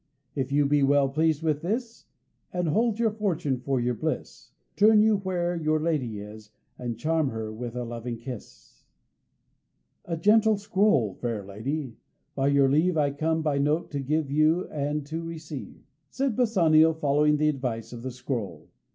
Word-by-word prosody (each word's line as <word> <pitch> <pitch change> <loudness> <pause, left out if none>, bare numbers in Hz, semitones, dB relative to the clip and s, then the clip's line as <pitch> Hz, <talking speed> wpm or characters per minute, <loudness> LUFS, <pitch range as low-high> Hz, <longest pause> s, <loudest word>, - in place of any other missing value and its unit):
If 135 -2 -3
you 145 0 +3
be 145 +1 +2
well 140 0 +4
pleased 155 +2 +1
with 155 -2 0
this, 230 +6 -4 0.4
And 180 -2 -1
hold 220 +6 +1
your 230 -2 +2
fortune 175 - -1
for 135 +1 -1
your 120 +1 0
bliss, 110 - -4 0.3
Turn 215 +1 +6
you 220 -1 +4
where 180 -2 -2
your 155 -1 +1
lady 135 -10 -1
is 105 +1 -11 0.3
And 120 -2 -4
claim 160 +1 +1
her 110 -3 -4
with 120 +1 -6
a 125 - -2
loving 120 0 -5
kiss." 120 -1 -10 1.2
"A 165 -1 -3
gentle 215 +4 +4
scroll. 200 - +2
Fair 110 -2 -4
lady, 120 +5 -4 0.4
by 135 0 0
your 140 -1 +4
leave 160 +5 +2
I 145 -2 +2
come 160 +3 -1
by 145 -3 +1
note 150 +4 0
to 145 - -2
give 145 +1 -1 0.4
and 145 0 -2
to 160 +3 -4
receive," 160 -4 -8 0.3
said 265 - -1
Bassanio, 165 -9 +4
following 150 -1 +2
the 155 +1 +2
advice 125 -5 -3
of 120 - -8
the 130 - -4
scroll. 120 - -5
150 Hz, 165 wpm, -26 LUFS, 125-165 Hz, 1.2 s, Turn